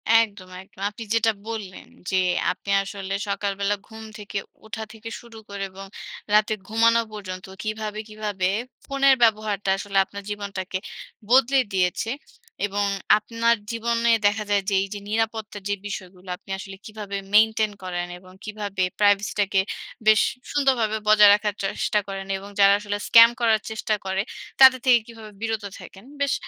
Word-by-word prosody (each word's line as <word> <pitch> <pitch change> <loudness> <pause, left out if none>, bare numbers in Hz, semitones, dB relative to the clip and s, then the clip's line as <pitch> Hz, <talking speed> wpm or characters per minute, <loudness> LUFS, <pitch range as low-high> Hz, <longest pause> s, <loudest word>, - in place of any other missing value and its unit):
একদম, 205 -5 +2
একদম। 190 - -19
আপনি 210 +2 -9
যেটা 225 0 +3 0.2
বললেন 210 -5 -6 0.2
যে, - - +1 0.4
আপনি 185 +2 -9
আসলে 195 -1 -5 0.2
সকালবেলা 200 0 -1
ঘুম 220 0 -10
থেকে 205 -1 -6 0.3
ওঠা 220 0 -5
থেকে 225 +1 -9
শুরু 235 -2 -14
করে 200 -1 -5
এবং 195 +1 -10 0.5
রাতে 215 +1 +4
ঘুমানো 230 +1 +4
পর্যন্ত 185 -3 -7 0.2
কীভাবে, 215 0 -4
কীভাবে 210 -3 -2 0.4
ফোনের 275 -1 +4
ব্যবহারটা 210 -3 +1
আসলে 200 0 -3
আপনার 200 +1 -9
জীবনটাকে 200 -2 -4 0.5
বদলে 265 +2 +5
দিয়েছে। 185 +4 0 0.6
এবং 205 0 -1 0.3
আপনার 230 +2 +1 0.2
জীবনে 230 0 +1 0.2
দেখা 205 +1 0
যায় 200 -1 +3
যে, - - -2
এই 195 - -2
যে 205 - -6
নিরাপত্তার 220 -1 -2
যে 205 - +1
বিষয়গুলা, 185 -2 -8
আপনি - - -25
আসলে 195 0 -8
কিভাবে 210 -2 -6 0.2
maintain 220 0 +4
করেন 175 -1 -3
এবং 185 0 -17
কিভাবে 205 -3 -3 0.2
privacy 205 -1 +3
টাকে 195 -1 +2 0.5
বেশ 215 -1 +7 0.3
সুন্দরভাবে 255 -7 +2
বজায় 210 -1 +8
রাখার 210 0 0
চেষ্টা 195 +2 0
করেন 195 -1 -5
এবং 195 +1 -10
যারা 200 0 +7
আসলে 205 0 -3
স্ক্যাম 230 0 +9
করার 220 -2 +3
চেষ্টা 220 0 -1
করে, 190 0 0 0.4
তাদের 260 -1 +9
থেকে 250 -2 +6
কিভাবে 225 -2 -11
বিরত 225 -1 -2 0.2
থাকেন। 195 +4 -13 0.2
বেশ 280 -1 +2
210 Hz, 150 wpm, -24 LUFS, 195-225 Hz, 0.6 s, স্ক্যাম